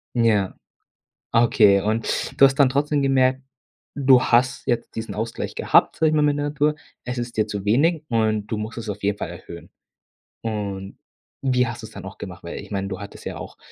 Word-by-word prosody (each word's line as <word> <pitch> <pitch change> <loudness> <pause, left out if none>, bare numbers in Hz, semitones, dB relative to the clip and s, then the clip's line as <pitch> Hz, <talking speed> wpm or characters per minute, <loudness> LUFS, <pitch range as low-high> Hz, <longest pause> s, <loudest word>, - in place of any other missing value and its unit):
Ja. 110 -5 +2 0.8
Okay, 105 -4 +5
und 110 +3 -1
du - - +10
hast 135 0 +5
dann 140 -3 +5
trotzdem 145 +2 +1
gemerkt, 130 -1 +3 0.5
du 135 -3 +5
hast 130 +3 +2
jetzt 120 -3 -2
diesen 110 0 -4
Ausgleich 115 +2 -4
gehabt - - +3
sage 160 - +3
ich - - 0
mal 150 - +3
mit 145 -1 +2
der 145 - -1
Natur. 150 +1 +1 0.3
Es 125 0 -4
ist 120 -1 -5
dir 110 - +2
zu 100 -1 -5
wenig 150 +10 +2
und 110 -3 +1
du 110 - -2
musst 110 +2 -5
es 115 -1 -7
auf 105 0 -5
jeden 100 0 +1
Fall - - -4
erhöhen. 85 - -11 0.7
Und 100 -3 -4 0.4
wie 125 -2 +2
hast 120 +1 -6
du 110 - -6
es - - -17
dann 100 - -9
auch 95 - -9
gemacht? 90 -2 -9
Weil 85 - -6
ich - - -10
meine, 100 -1 -2
du 95 -2 -5
hattest 100 0 -10
ja - - -5
auch, - - -9
115 Hz, 210 wpm, -23 LUFS, 105-135 Hz, 0.8 s, du